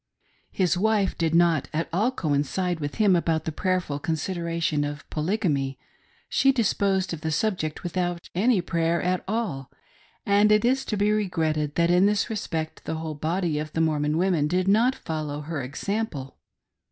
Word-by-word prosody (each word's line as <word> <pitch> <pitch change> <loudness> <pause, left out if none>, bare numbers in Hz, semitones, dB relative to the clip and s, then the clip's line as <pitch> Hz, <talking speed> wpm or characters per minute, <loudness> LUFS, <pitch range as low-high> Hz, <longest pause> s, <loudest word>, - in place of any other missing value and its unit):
His 180 -4 +1
wife 210 -1 +2
did 165 -1 0
not 170 -4 +3
at 160 +2 -1
all 210 +8 +2
coincide 170 - -1
with 145 -1 -4
him 205 -4 +4
about 165 -2 0
the 160 - -2
prayerful 180 -4 -1
consideration 165 -1 -1
of 145 0 -5
Polygamy; 150 - -1 0.5
she 270 - +3
disposed 195 -6 +1
of 160 - -6
the 160 - -2
subject 160 -2 -1
without 175 0 -2
any 210 +2 +3
prayer 170 -1 0
at 180 0 0
all, 190 - -2 0.6
and 205 +1 +4
it 210 +2 +4
is 265 +2 +2
to 215 - -2
be 205 +1 +2
regretted 160 -8 0
that 170 0 +3
in 180 +3 +5
this 210 +2 0
respect 160 -7 -4
the - - -2
whole 160 -1 -4
body 160 +1 -1
of 155 0 -5
the 160 - 0
Mormon 150 -1 +1
women 175 -4 +2
did 180 +3 0
not 230 +6 +4
follow 150 -2 -4
her 150 -1 -4
example. 140 - -4
170 Hz, 165 wpm, -25 LUFS, 155-195 Hz, 0.6 s, in